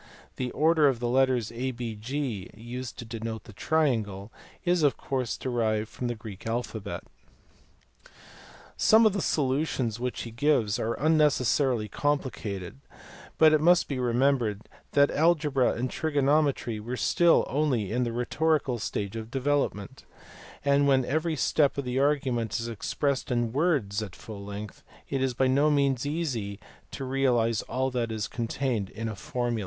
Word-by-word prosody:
The 125 -1 -2
order 155 -1 +4
of 130 -4 +1
the 120 - -1
letters 125 -2 +2
ABG, 120 -2 -4
used 120 +3 -7
to 120 - -7
denote 115 -1 -5
the 110 - -13
triangle, 110 -8 0 0.3
is 175 -1 +2
of 145 -3 +3
course 130 -4 -2
derived 110 -4 -1
from 125 - -4
the 120 - -2
Greek 110 -2 -9
alphabet. 115 -3 -4 1.7
Some 220 +1 +5
of 215 - +4
the 200 - -1
solutions 130 -6 0
which 125 0 -3
he 115 - -7
gives 120 -5 +1
are 115 +1 -1
unnecessarily 140 -6 +2
complicated, 110 -6 -3 0.6
but 155 -1 +6
it 155 - +4
must 175 +2 +4
be 135 -3 -3
remembered 120 -3 +1 0.3
that 140 0 +5
algebra 150 -5 +2
and 125 +3 -2
trigonometry 145 -5 +1
were 120 +4 -5
still 170 +5 +4
only 130 -9 0
in 125 +2 +1
the 120 - -1
rhetorical 130 +2 0
stage 100 0 -3
of 110 0 -6
develop 140 +1 +1
ment, 100 -1 -10 0.6
and 140 0 +4
when 135 -2 +3
every, 155 +4 0
step 145 0 +2
of 140 - -2
the 125 +1 -1
argument 130 -6 +1
is 115 - -4
expressed 130 +4 -2
in 120 -2 0
words 135 - +1
at 100 -5 -7
full 105 -3 -9
length 100 -1 -7 0.3
it 135 -1 -1
is 130 -2 0
by 130 - +2
no 140 +4 +3
means 140 -2 +1
easy 125 -11 -3 0.3
to 135 - -6
realise 125 -4 +1
all 130 +1 -1
that 120 -2 -1
is 110 -1 -2
contained 115 -3 -2
in 115 +3 -5
a 110 - -4
formula. 120 +2 -2
125 Hz, 155 wpm, -27 LUFS, 115-145 Hz, 1.7 s, but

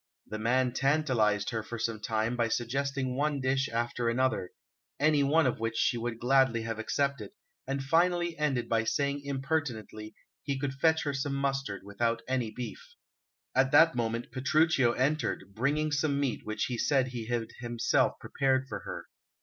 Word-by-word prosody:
The 110 - -6
man 125 +3 +2
tantalized 130 -8 +1
her 115 -2 -2
for 115 +2 -7
some 110 -1 -2
time 110 +2 -1
by 120 -1 +1
suggesting 130 +2 -1
one 145 +1 0
dish 135 0 0
after 120 +1 -1
another, 125 -6 0 0.5
any 150 0 +4
one 150 +3 +3
of 125 - 0
which 115 0 -2
she 120 - +2
would 115 -1 -3
gladly 125 -2 +3
have 115 -1 -4
accepted, 140 +5 -1 0.4
and 135 0 -2
finally 175 +3 +2
ended 135 -6 0
by 115 0 +1
saying 140 +4 0
impertinently 135 -7 -3 0.3
he 140 -2 -2
could 135 0 -2
fetch 160 +4 +2
her 145 - -1
some 140 +1 -2
mustard 135 -7 -2
without 115 +3 -1
any 130 -3 0
beef. 480 - -8 0.6
At 130 0 +3
that 160 +3 +7
moment 115 -1 -2
Petruchio 135 -1 +3
entered, 135 -6 -1
bringing 145 +7 0
some 145 -1 +1
meat 135 -7 -2
which 110 - -1
he 120 -2 -3
said 135 -3 +2
he 120 -3 -6
had 115 -2 -2
himself 120 -1 +1
prepared 130 -1 0
for - - -5
her. - - -7
130 Hz, 165 wpm, -30 LUFS, 115-140 Hz, 0.6 s, that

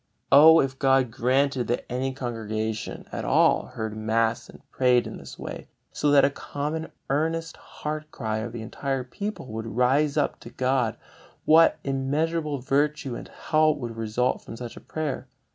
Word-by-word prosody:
Oh, 160 +3 +9
if 135 -1 -3
God 135 -3 +3
granted 130 +1 +1
that 120 - -1
any 130 +2 -2
congregation 110 -4 -4
at - - -4
all - - +3
heard 110 -1 -5
mass 110 +1 0
and - - -16
prayed 125 -2 +3
in - - -7
this - - -11
way, - - -7 0.2
so 150 - 0
that 145 -1 +6
a 140 - +2
common 150 +3 -4 0.2
earnest 160 +3 -1
heart 155 0 -6
cry 110 -6 -3
of 115 +2 -4
the 115 -1 -6
entire 135 +3 -3
people 200 - -5
would 110 +1 -5
rise 140 +4 +3
up 145 - 0
to - - -11
God, 130 -3 0 0.5
what 165 +1 +6
immeasurable 145 +3 -1
virtue 140 +1 0
and - - -8
help 155 -1 +1
would 120 -4 -5
result 115 +3 0
from 115 - -9
such 120 -1 -7
a - - -9
prayer! 150 -4 -4
135 Hz, 165 wpm, -26 LUFS, 120-150 Hz, 0.5 s, Oh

